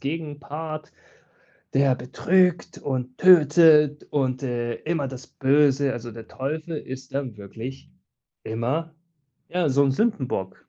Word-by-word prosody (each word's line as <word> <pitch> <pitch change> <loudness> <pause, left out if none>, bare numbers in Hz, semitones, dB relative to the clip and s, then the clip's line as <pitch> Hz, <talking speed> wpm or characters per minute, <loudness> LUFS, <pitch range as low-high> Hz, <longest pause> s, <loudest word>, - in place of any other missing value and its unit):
Gegenpart, 155 +1 -5 0.8
der 135 -1 +3
betrügt 175 +8 +1
und 130 -2 -4
tötet 155 -4 +6
und, 130 -2 -1
äh, 120 -2 -2
immer 155 -4 -1
das 130 -1 -9
Böse 140 0 +2
also, 120 0 -7
der 115 0 -11
Teufel 155 +5 -4
ist 130 -1 -8
dann 135 -6 -4
wirklich 115 +7 -9 0.5
immer, 130 +9 -2 0.6
ja, 175 -3 0
so 140 +1 +3
'n 135 - +2
Sündenbock. 130 - -1
140 Hz, 120 wpm, -24 LUFS, 130-155 Hz, 0.8 s, tötet